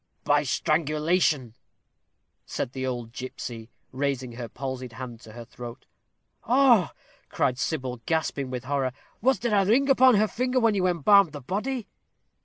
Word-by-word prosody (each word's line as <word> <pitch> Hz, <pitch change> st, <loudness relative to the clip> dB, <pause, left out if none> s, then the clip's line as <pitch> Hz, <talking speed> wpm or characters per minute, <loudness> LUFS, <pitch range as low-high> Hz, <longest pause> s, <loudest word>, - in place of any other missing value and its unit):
"By 145 Hz, 0 st, +3 dB
strangulation," 150 Hz, -2 st, +1 dB, 0.9 s
said -, -, -4 dB
the 130 Hz, -1 st, -3 dB
old 120 Hz, -3 st, -4 dB
gipsy, 120 Hz, -2 st, -7 dB, 0.2 s
raising 130 Hz, -2 st, -2 dB
her 120 Hz, -1 st, -7 dB
palsied 130 Hz, -1 st, -6 dB
hand 120 Hz, -1 st, -8 dB
to 110 Hz, -2 st, -14 dB
her 120 Hz, 0 st, -9 dB
throat. 120 Hz, 0 st, -10 dB, 0.6 s
"Oh!" 245 Hz, -, +5 dB, 0.4 s
cried 125 Hz, -1 st, 0 dB
Sybil, 130 Hz, -4 st, -3 dB
gasping 160 Hz, -5 st, -1 dB
with 125 Hz, -1 st, -5 dB
horror. 135 Hz, -1 st, -1 dB, 0.3 s
"Was 265 Hz, +3 st, +3 dB
there 235 Hz, -2 st, -2 dB
a 200 Hz, -1 st, +4 dB
ring 260 Hz, +8 st, +3 dB
upon 260 Hz, -2 st, +6 dB
her 215 Hz, +1 st, +3 dB
finger 255 Hz, +3 st, 0 dB
when 230 Hz, -3 st, +3 dB
you 185 Hz, -2 st, +1 dB
embalmed 180 Hz, +1 st, +4 dB
the 145 Hz, -, -7 dB
body?" 215 Hz, -, -3 dB
145 Hz, 150 wpm, -26 LUFS, 125-205 Hz, 0.9 s, upon